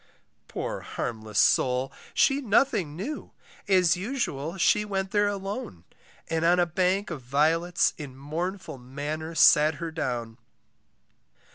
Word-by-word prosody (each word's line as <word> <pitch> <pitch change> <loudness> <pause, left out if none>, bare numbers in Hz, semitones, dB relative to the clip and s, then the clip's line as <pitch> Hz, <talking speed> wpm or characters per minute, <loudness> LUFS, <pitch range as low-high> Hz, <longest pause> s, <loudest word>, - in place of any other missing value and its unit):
Poor - - -4
harmless 110 -3 -5
soul 130 +1 +3 0.2
she 275 +1 +3
nothing 210 - +1
knew, 240 - -6 0.3
As 185 -3 +4
usual 180 - -3
she 210 +3 +3
went 195 -2 -3
there 205 0 +3
alone, 200 - -5 0.4
And 165 0 -1
on 175 +2 +4
a 175 - +4
bank 185 +3 0
of 150 -5 -5
violets 160 +7 +2
In 135 -4 -8
mournful 165 +3 -5
manner 150 +6 -5
sat 155 0 +6
her 165 +3 -5
down. 120 -7 -4
165 Hz, 125 wpm, -27 LUFS, 140-195 Hz, 0.4 s, sat